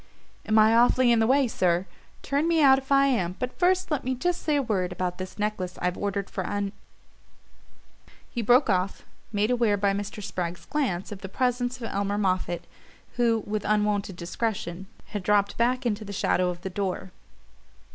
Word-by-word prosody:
"Am 220 Hz, 0 st, +3 dB
I 220 Hz, +1 st, +6 dB
awfully 245 Hz, +1 st, +5 dB
in 235 Hz, -, +4 dB
the 225 Hz, -, +3 dB
way, 270 Hz, +1 st, +4 dB
sir? 180 Hz, -4 st, +1 dB, 0.4 s
Turn 285 Hz, +4 st, 0 dB
me 335 Hz, -1 st, +3 dB
out 270 Hz, -3 st, +6 dB
if 270 Hz, +1 st, -14 dB
I 275 Hz, 0 st, +6 dB
am 185 Hz, -10 st, 0 dB
but 250 Hz, 0 st, -5 dB
first 370 Hz, 0 st, +2 dB
let 295 Hz, -3 st, 0 dB
me 260 Hz, +1 st, -1 dB
just 355 Hz, +7 st, -1 dB
say 300 Hz, -, +1 dB
a 285 Hz, -, +3 dB
word 190 Hz, -6 st, -1 dB
about 180 Hz, 0 st, -3 dB
this 185 Hz, 0 st, -7 dB
necklace 205 Hz, -4 st, -3 dB
I've 180 Hz, 0 st, -1 dB
ordered 200 Hz, -1 st, -2 dB
for -, -, -4 dB
Un 205 Hz, -1 st, -2 dB, 0.8 s
" -, -, -29 dB
He 240 Hz, -, -1 dB
broke 245 Hz, +5 st, +4 dB
off, 190 Hz, -2 st, -1 dB, 0.3 s
made 210 Hz, +2 st, +1 dB
aware 235 Hz, -4 st, +2 dB
by 200 Hz, 0 st, +2 dB
Mr. 205 Hz, +1 st, -5 dB
Spragg's 175 Hz, -2 st, -4 dB
glance 245 Hz, -13 st, -2 dB
of 200 Hz, -2 st, -7 dB
the 195 Hz, -, -6 dB
presence 245 Hz, +2 st, 0 dB
of 250 Hz, -, -10 dB
Elmer 200 Hz, -2 st, -1 dB
Moffatt, 185 Hz, -3 st, -1 dB, 0.5 s
who, 230 Hz, -3 st, +2 dB
with 210 Hz, 0 st, -2 dB
unwonted 210 Hz, -2 st, 0 dB
discretion, 185 Hz, 0 st, -4 dB, 0.2 s
had 205 Hz, -, -4 dB
dropped 200 Hz, +1 st, +2 dB
back 250 Hz, +2 st, +1 dB
into 215 Hz, -2 st, -1 dB
the 200 Hz, -1 st, -7 dB
shadow 180 Hz, -1 st, +1 dB
of 175 Hz, -1 st, -5 dB
the 190 Hz, -, -4 dB
door. 190 Hz, -1 st, -3 dB
210 Hz, 190 wpm, -26 LUFS, 190-245 Hz, 0.8 s, I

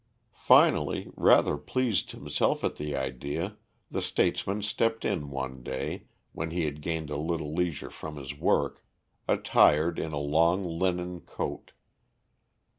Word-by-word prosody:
Finally, -, -, +4 dB
rather 75 Hz, -, +5 dB
pleased 115 Hz, -, 0 dB
himself -, -, -1 dB
at -, -, -1 dB
the 75 Hz, -1 st, -3 dB
idea, 70 Hz, -, -3 dB, 0.4 s
the -, -, -1 dB
statesman 100 Hz, +2 st, 0 dB
stepped 115 Hz, +2 st, 0 dB
in 80 Hz, -8 st, -1 dB
one 65 Hz, -1 st, -5 dB
day, 65 Hz, +1 st, -4 dB, 0.3 s
when 80 Hz, +1 st, -4 dB
he 85 Hz, 0 st, -1 dB
had 75 Hz, 0 st, -4 dB
gained 80 Hz, -1 st, -3 dB
a 75 Hz, -, -2 dB
little 80 Hz, -1 st, -2 dB
leisure 85 Hz, -3 st, -2 dB
from 80 Hz, -1 st, -8 dB
his 65 Hz, -2 st, -6 dB
work, -, -, 0 dB, 0.4 s
attired 80 Hz, +3 st, +4 dB
in 80 Hz, -, -3 dB
a 75 Hz, -, -3 dB
long 85 Hz, +6 st, +2 dB
linen 90 Hz, +1 st, -1 dB
coat. -, -, -5 dB
80 Hz, 135 wpm, -28 LUFS, 75-90 Hz, 0.4 s, rather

